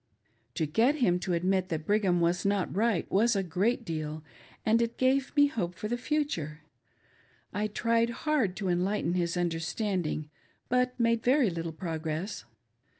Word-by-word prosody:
To 160 Hz, -, 0 dB
get 225 Hz, -, +3 dB
him 180 Hz, -11 st, +2 dB
to 180 Hz, 0 st, -2 dB
admit 185 Hz, +2 st, +1 dB
that 160 Hz, -3 st, -3 dB
Brigham 195 Hz, -3 st, +2 dB
was 170 Hz, +2 st, +1 dB
not 200 Hz, -3 st, 0 dB
right 215 Hz, -4 st, +1 dB
was 225 Hz, +4 st, +3 dB
a 195 Hz, -, +1 dB
great 205 Hz, +8 st, 0 dB
deal, 155 Hz, -3 st, -4 dB, 0.4 s
and 225 Hz, +2 st, +4 dB
it 235 Hz, 0 st, -1 dB
gave 265 Hz, +2 st, +1 dB
me 290 Hz, -1 st, +7 dB
hope 200 Hz, -, -2 dB
for 210 Hz, -, -4 dB
the 240 Hz, -, -1 dB
future. 245 Hz, -, -2 dB, 0.9 s
I 210 Hz, +2 st, 0 dB
tried 230 Hz, +2 st, +1 dB, 0.2 s
hard 270 Hz, -12 st, +2 dB
to 195 Hz, -1 st, -3 dB
enlighten 180 Hz, 0 st, 0 dB
his 175 Hz, -1 st, 0 dB
understanding, 165 Hz, -2 st, -2 dB, 0.4 s
but 250 Hz, 0 st, +1 dB
made 230 Hz, -1 st, +2 dB
very 255 Hz, -4 st, +3 dB
little 165 Hz, -1 st, -4 dB
progress. 160 Hz, -, -4 dB
195 Hz, 155 wpm, -29 LUFS, 170-230 Hz, 0.9 s, me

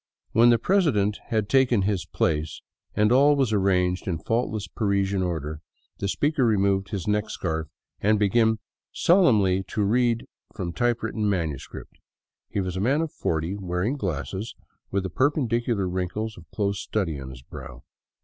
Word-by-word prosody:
When 115 Hz, +2 st, +6 dB
the 120 Hz, -, +6 dB
president 115 Hz, -, +2 dB
had 110 Hz, -3 st, 0 dB
taken 125 Hz, -5 st, +3 dB
his 100 Hz, -2 st, -1 dB
place 80 Hz, 0 st, -1 dB, 0.3 s
and 105 Hz, +1 st, +3 dB
all 140 Hz, +3 st, +6 dB
was 130 Hz, -6 st, +1 dB
arranged 90 Hz, -2 st, +1 dB
in 90 Hz, -3 st, 0 dB
faultless 110 Hz, +1 st, -1 dB
Parisian 100 Hz, -1 st, 0 dB
order, 80 Hz, -4 st, -3 dB, 0.4 s
the 100 Hz, -, -1 dB
speaker 145 Hz, +7 st, +1 dB
removed 100 Hz, -3 st, +2 dB
his 100 Hz, -4 st, -4 dB
neck 105 Hz, +1 st, 0 dB
scarf 80 Hz, -6 st, -3 dB, 0.3 s
and 105 Hz, +1 st, +3 dB
began 110 Hz, +2 st, +3 dB, 0.3 s
solemnly 110 Hz, -, +4 dB
to 105 Hz, -, -1 dB
read 120 Hz, +2 st, +2 dB, 0.3 s
from 85 Hz, -2 st, -4 dB
type 120 Hz, +2 st, 0 dB
written 105 Hz, -2 st, -1 dB
manuscript. 80 Hz, -8 st, -4 dB, 0.5 s
He -, -, -2 dB
was 90 Hz, -1 st, -3 dB
a 95 Hz, -, -2 dB
man 135 Hz, +8 st, +2 dB
of 165 Hz, -2 st, -2 dB
forty, 80 Hz, +4 st, -2 dB
wearing 95 Hz, +5 st, -2 dB
glasses, 95 Hz, -, -4 dB, 0.3 s
with 100 Hz, -1 st, -1 dB
the 95 Hz, -, -4 dB
perpendicular 120 Hz, -, +1 dB
wrinkles 95 Hz, +5 st, -3 dB
of 85 Hz, -3 st, -15 dB
close 100 Hz, +1 st, -1 dB
study 85 Hz, -9 st, -2 dB
on 65 Hz, -1 st, -7 dB
his 65 Hz, -1 st, -11 dB
brow. -, -, -10 dB
100 Hz, 160 wpm, -25 LUFS, 90-115 Hz, 0.5 s, When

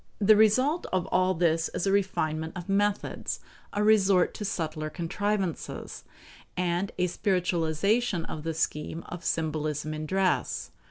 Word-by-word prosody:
The 215 Hz, +1 st, +6 dB
result 255 Hz, +10 st, +3 dB
of 185 Hz, -2 st, +1 dB
all 185 Hz, 0 st, +3 dB
this 165 Hz, -1 st, +2 dB
is -, -, -1 dB
a 195 Hz, -, +2 dB
refinement 160 Hz, -5 st, 0 dB
of 175 Hz, -, -7 dB
methods, 205 Hz, +1 st, 0 dB, 0.3 s
a 205 Hz, -, 0 dB
resort 200 Hz, -4 st, +4 dB
to -, -, -6 dB
subtler 155 Hz, -5 st, -2 dB
contrivances, 190 Hz, +2 st, -3 dB, 0.5 s
and 180 Hz, +2 st, 0 dB
a 180 Hz, -, +2 dB
spiritualization 180 Hz, +1 st, +1 dB
of 155 Hz, -, -6 dB
the 165 Hz, +1 st, -3 dB
scheme 160 Hz, +1 st, -2 dB
of 175 Hz, -1 st, -7 dB
symbolism 155 Hz, -2 st, -1 dB
in 155 Hz, 0 st, -4 dB
dress. 190 Hz, +2 st, 0 dB
180 Hz, 140 wpm, -28 LUFS, 160-200 Hz, 0.5 s, The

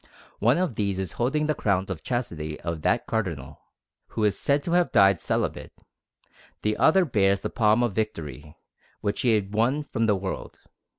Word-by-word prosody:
One 120 Hz, +7 st, +3 dB
of 180 Hz, -6 st, 0 dB
these 100 Hz, -3 st, -1 dB
is 95 Hz, -3 st, -3 dB
holding 145 Hz, +6 st, 0 dB
the 155 Hz, -, +1 dB
crown 95 Hz, -8 st, 0 dB
of 90 Hz, -5 st, -4 dB
chastity 80 Hz, -12 st, -4 dB
of 85 Hz, -2 st, -4 dB
that -, -, +1 dB
Cardinal, 80 Hz, -, -3 dB, 0.5 s
who 110 Hz, -, -3 dB
is 105 Hz, -2 st, +3 dB
said 140 Hz, +5 st, +1 dB
to 170 Hz, -, -3 dB
have 175 Hz, 0 st, +2 dB
died 100 Hz, -4 st, +5 dB
celibate; -, -, -2 dB, 0.9 s
the 105 Hz, 0 st, +1 dB
other 180 Hz, +3 st, +4 dB
bears 100 Hz, -, +2 dB
the -, -, -4 dB
palm 110 Hz, 0 st, +3 dB
of 120 Hz, -4 st, 0 dB
victory, 80 Hz, -, -4 dB, 0.5 s
which 100 Hz, 0 st, -1 dB
he 120 Hz, -3 st, +3 dB
had 100 Hz, -1 st, -2 dB
won 125 Hz, +7 st, +1 dB
from 115 Hz, -5 st, -1 dB
the 105 Hz, -, +3 dB
world. 95 Hz, 0 st, -5 dB
105 Hz, 180 wpm, -25 LUFS, 95-120 Hz, 0.9 s, died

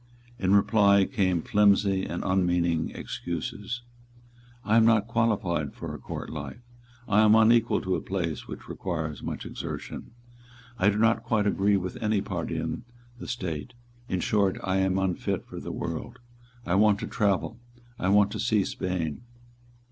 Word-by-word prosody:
In 95 Hz, +1 st, +3 dB
reply 100 Hz, -1 st, +5 dB
came 95 Hz, -8 st, 0 dB
flimsy 100 Hz, -2 st, +3 dB
and 85 Hz, -, -4 dB
unmeaning 90 Hz, -3 st, +1 dB
excuses: 100 Hz, +8 st, -5 dB, 0.8 s
"I 110 Hz, -, +2 dB
am 115 Hz, -, +6 dB
not 110 Hz, -2 st, +4 dB
qualified 105 Hz, -, 0 dB
for -, -, -6 dB
a -, -, -7 dB
court -, -, -6 dB
life; 75 Hz, -, -7 dB, 0.4 s
I 105 Hz, 0 st, +4 dB
am 110 Hz, 0 st, +6 dB
unequal 115 Hz, +1 st, +4 dB
to 95 Hz, -1 st, -1 dB
a -, -, -1 dB
place 85 Hz, -6 st, -3 dB
which -, -, -9 dB
requires 80 Hz, -5 st, -4 dB
much -, -, -5 dB
exertion; -, -, -6 dB, 0.7 s
I 100 Hz, -, +5 dB
do 105 Hz, -, 0 dB
not 110 Hz, +1 st, +3 dB
quite 110 Hz, -3 st, 0 dB
agree 100 Hz, 0 st, +2 dB
with 95 Hz, -1 st, -4 dB
any 110 Hz, -2 st, +1 dB
party 90 Hz, -5 st, -3 dB
in 80 Hz, +7 st, -3 dB, 0.4 s
the -, -, -7 dB
State; 95 Hz, -, -4 dB, 0.3 s
in 90 Hz, -1 st, -1 dB
short, 100 Hz, -3 st, +1 dB
I 95 Hz, 0 st, 0 dB
am 95 Hz, 0 st, +1 dB
unfit 95 Hz, -2 st, -1 dB
for -, -, -8 dB
the -, -, -6 dB
world; 115 Hz, +10 st, -5 dB, 0.5 s
I 90 Hz, -, -1 dB
want 105 Hz, +1 st, +4 dB
to -, -, -2 dB
travel; 105 Hz, +2 st, 0 dB, 0.4 s
I 95 Hz, -, 0 dB
want 100 Hz, 0 st, +4 dB
to 110 Hz, -, -4 dB
see 110 Hz, -2 st, +2 dB
Spain." 90 Hz, -1 st, -3 dB
100 Hz, 160 wpm, -27 LUFS, 90-110 Hz, 0.8 s, am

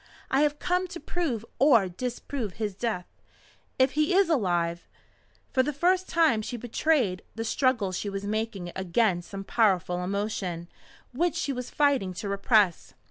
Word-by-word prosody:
I 270 Hz, -, +3 dB
have 295 Hz, 0 st, +2 dB
come 360 Hz, +2 st, 0 dB
to 340 Hz, -, -8 dB
prove 280 Hz, -, -2 dB
or 235 Hz, -8 st, +5 dB
disprove 240 Hz, +2 st, -4 dB
his 210 Hz, -1 st, -3 dB
death. 200 Hz, -3 st, -2 dB, 0.7 s
If 260 Hz, 0 st, +4 dB
he 305 Hz, +5 st, +1 dB
is 390 Hz, -3 st, +4 dB
alive 175 Hz, -, 0 dB, 0.3 s
" -, -, -37 dB
For 260 Hz, -, +4 dB
the 285 Hz, +3 st, -1 dB
first 360 Hz, +6 st, +1 dB
time 320 Hz, -10 st, +3 dB
she 240 Hz, +3 st, -5 dB
betrayed 240 Hz, -, +1 dB
the 225 Hz, 0 st, -3 dB
struggle 235 Hz, -5 st, +1 dB
she 195 Hz, +3 st, -3 dB
was 195 Hz, 0 st, -4 dB
making 210 Hz, -4 st, -3 dB
against 190 Hz, -1 st, 0 dB
some 195 Hz, -1 st, -6 dB
powerful 185 Hz, -5 st, +1 dB
emotion 190 Hz, -3 st, -3 dB, 0.4 s
which 330 Hz, +5 st, 0 dB
she 315 Hz, -5 st, -1 dB
was 250 Hz, -1 st, -5 dB
fighting 270 Hz, -11 st, +1 dB
to 200 Hz, -, -5 dB
repress. 200 Hz, -2 st, +2 dB
225 Hz, 160 wpm, -27 LUFS, 190-285 Hz, 0.7 s, or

